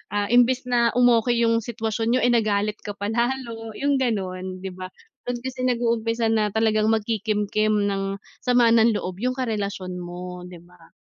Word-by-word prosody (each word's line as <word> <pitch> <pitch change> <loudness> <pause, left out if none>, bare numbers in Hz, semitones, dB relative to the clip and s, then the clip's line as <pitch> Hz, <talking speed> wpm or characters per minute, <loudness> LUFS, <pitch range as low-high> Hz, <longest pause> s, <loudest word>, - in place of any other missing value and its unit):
ah, 205 +2 0
imbis 245 +1 +4
na, 240 -2 +1
um, 245 0 +5 0.2
'yung 230 -1 +2
sitwasyon 225 +1 -2
n'yo 255 - +1
ay 245 - +4
nagalit 210 -2 +1
ka 205 -1 -7
pa 205 +2 -3
lalo 235 -2 -2
'yung 280 -1 +1
gano'n 185 -5 -3
'di 190 - -4
ba. 185 0 -7 0.4
Dun 245 -1 -2
kasi 260 -1 -5
nag-uumpisa 230 -1 0
na 215 -1 +2
talagang 215 0 +2
magkikimkim 215 -1 0
ng 195 -1 -1 0.2
sama 245 -2 +3
ng 230 -1 +4
loob 185 -1 -4
'yung 255 +2 -1
karelasyon 200 -7 -3
mo, 180 0 -7
'di 175 -2 -11
ba. 175 -2 -21
220 Hz, 170 wpm, -23 LUFS, 200-240 Hz, 0.4 s, um